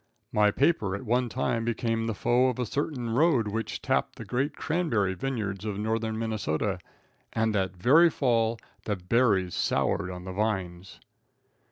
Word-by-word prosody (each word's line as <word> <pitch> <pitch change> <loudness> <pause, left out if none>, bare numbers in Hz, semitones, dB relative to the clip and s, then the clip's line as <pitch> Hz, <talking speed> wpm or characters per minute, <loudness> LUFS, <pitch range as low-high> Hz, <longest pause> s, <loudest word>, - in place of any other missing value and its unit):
My 105 -1 +4
paper 110 - +1
at 100 - -7
one 120 +2 +1
time 120 -1 -1
became 115 0 -1
the 110 - -2
foe 125 +5 +3
of 125 - -3
a 125 - -1
certain 130 -2 -3
road 130 -3 +3
which 110 +2 -4
tapped - - 0
the - - -8
great 135 +4 -1
cranberry 125 - 0
vineyards 100 -2 -3
of 105 -2 -3
northern 110 +1 -1
Minnesota, 110 -8 -1 0.5
and 110 -1 +1
that 95 -2 -1
very 155 - +6
fall 115 -6 +1 0.3
the 105 - 0
berries 95 -1 +1
soured 90 - 0
on 90 -1 -7
the 95 - -5
vines! 95 -3 -3
115 Hz, 160 wpm, -27 LUFS, 100-125 Hz, 0.5 s, very